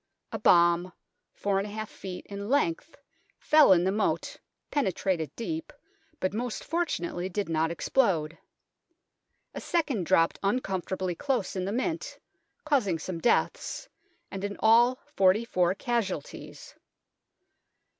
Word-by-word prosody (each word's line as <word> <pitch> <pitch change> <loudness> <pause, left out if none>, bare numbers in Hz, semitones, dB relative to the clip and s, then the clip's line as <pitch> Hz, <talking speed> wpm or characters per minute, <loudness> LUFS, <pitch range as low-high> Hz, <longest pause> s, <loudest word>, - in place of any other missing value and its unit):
A 225 - -4
bomb 175 -1 +4 0.5
4^ 195 -1 +1
ft. 205 -3 -7
in 200 +1 -6
length 285 - 0 0.4
fell 305 -7 +5
in 175 -2 +5
the 190 - +2
moat, 210 +1 -1 0.4
penetrated 190 - 0
deep, 320 +7 -4 0.5
but 185 +1 -1
most 240 +1 -3
fortunately 185 - -2
did 200 +2 -2
not 160 0 +1
explode. 170 -3 +1 1.2
A - - -6
second 285 - -1
dropped 165 -3 +3
uncomfortably 190 -4 -1
close 250 0 -2
in 185 -1 -2
the 195 - -2
Mint, 325 - -2 0.5
causing 245 - +2
some 170 +2 -5
deaths, 240 - 0 0.4
and 195 0 -5
in 205 0 -3
all 235 +3 +5
forty 215 -6 +3
four 180 -4 +1
casualties. 215 - -4
200 Hz, 115 wpm, -28 LUFS, 180-245 Hz, 1.2 s, fell